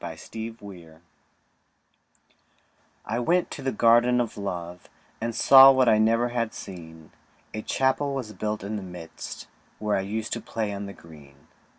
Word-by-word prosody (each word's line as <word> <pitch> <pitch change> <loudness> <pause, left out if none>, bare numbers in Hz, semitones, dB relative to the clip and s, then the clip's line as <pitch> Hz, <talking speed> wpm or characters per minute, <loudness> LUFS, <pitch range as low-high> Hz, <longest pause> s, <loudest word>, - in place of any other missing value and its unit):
THE - - -5
GARDEN 110 0 -7
OF 115 0 -12
LOVE 85 -5 -12 2.0
I 115 +2 -2
went 170 +8 +1
to - - -7
the 135 0 -1
Garden 120 +2 +4
of 120 -2 -2
Love, 90 -3 -6 0.3
And 115 0 -3
saw 135 0 +9
what 130 -2 +3
I 110 -1 +5
never 115 +2 +2
had 115 -2 -2
seen; 80 -4 -10 0.4
A 110 - -4
Chapel 135 +4 0
was 115 -5 -5
built 105 +1 -4
in 105 +2 -4
the - - -5
midst, 90 -3 -9 0.3
Where 105 -1 -1
I - - 0
used 105 +3 -4
to - - -4
play 110 -3 -3
on 100 0 -5
the 100 - -8
green. 75 -6 -16
110 Hz, 170 wpm, -25 LUFS, 95-120 Hz, 2.0 s, saw